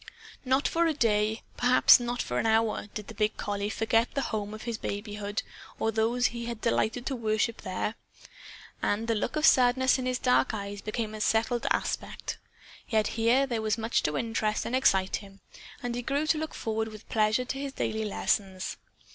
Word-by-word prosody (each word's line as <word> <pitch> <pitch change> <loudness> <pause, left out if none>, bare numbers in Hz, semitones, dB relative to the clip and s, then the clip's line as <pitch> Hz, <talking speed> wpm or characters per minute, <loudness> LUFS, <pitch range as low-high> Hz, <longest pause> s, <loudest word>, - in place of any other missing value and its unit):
Not 265 +2 +2
for 335 0 +2
a 315 - 0
day, 215 -3 +1
perhaps 250 +1 +7
not 240 0 -2
for 125 0 -2
an - - +1
hour, 220 -1 +1
did 210 -2 -5
the - - -8
big 215 0 0
collie 205 0 -2
forget 225 +2 +1
the 275 - +1
home 210 -1 -2
of 215 0 -8
his 235 -2 -4
babyhood 205 0 -4 0.3
or 225 - 0
those 230 +3 +1
he 235 0 -6
had 235 -2 -4
delighted 230 +1 0
to 270 - -1
worship, 220 0 0
there. 185 +3 -2 0.9
And 215 +3 0
the 230 - +2
look 210 - -2
of 305 0 +2
sadness 260 0 +5
in 255 - -2
his 255 0 0
dark 250 -2 +2
eyes 200 -1 -5
became 215 0 -3
a 215 - -6
settled 230 +2 +1
aspect. - - -2 0.5
Yet, 215 -2 +2
here, 235 +4 +3
there 235 -4 -2
was 215 -2 0
much 225 +1 +1
to 150 -1 -1
interest 225 -2 -1
and - - -4
to - - +4
excite 190 -7 +3
him. 195 -1 -13 0.4
And 245 -1 -2
he 245 - -2
grew 280 +5 -1
to 310 - +2
look 315 0 -4
forward 220 0 -2
with 215 -1 -11
pleasure 215 +3 +2
to 270 +2 -4
his 280 0 -4
daily 220 -4 -2
lessons. 195 -2 -1
225 Hz, 195 wpm, -28 LUFS, 215-245 Hz, 0.9 s, perhaps